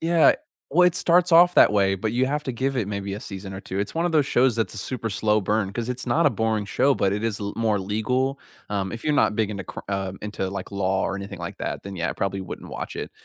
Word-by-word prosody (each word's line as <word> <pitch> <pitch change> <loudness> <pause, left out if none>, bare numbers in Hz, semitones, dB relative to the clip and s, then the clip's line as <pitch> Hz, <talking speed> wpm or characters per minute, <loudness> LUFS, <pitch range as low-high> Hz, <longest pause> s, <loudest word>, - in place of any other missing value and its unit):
yeah 165 0 +5 0.4
well, 180 +5 +5
it 180 - +2
starts 175 0 +3
off 175 +2 +7
that - - +7
way, 100 -2 +3
but, 105 +3 -2
you 125 +2 +2
have 150 +2 -1
to 130 -4 -3
give 135 +3 -1
it 115 -5 0
maybe 100 -1 -4
a 105 - -6
season 95 -2 -7
or 95 - -6
2. 95 0 -5
It's 100 - -3
one 165 +1 0
of 175 - 0
those 150 -3 +3
shows 125 -1 +3
that's 115 0 -1
a - - -6
super 115 +2 -3
slow 105 +1 +1
burn, 100 0 0
'cause 120 +2 -3
it's 125 0 -4
not 120 - +3
a - - +5
boring 110 -2 -1
show, 135 +6 +2
but, 100 - +1
it 105 +2 -2
is 110 -2 -2
l 100 0 -4
more 110 -3 +1
legal. 125 +8 -1 0.3
Um, 100 -2 -2
if 115 - -6
you're 150 - +1
not 105 - +3
big 110 -2 +1
into 100 -3 -5
cr - - -7
um, 95 -1 -3
into 105 -2 -3
like 100 -1 -6
law 95 -1 0
or 100 - -2
anything 100 0 -7
like - - -6
that, - - -4
then 100 -1 -7
yeah, 85 - -1
I - - -3
probably 95 0 -2
wouldn't 90 - -8
watch - - -6
it, - - -5
105 Hz, 280 wpm, -24 LUFS, 100-130 Hz, 0.4 s, off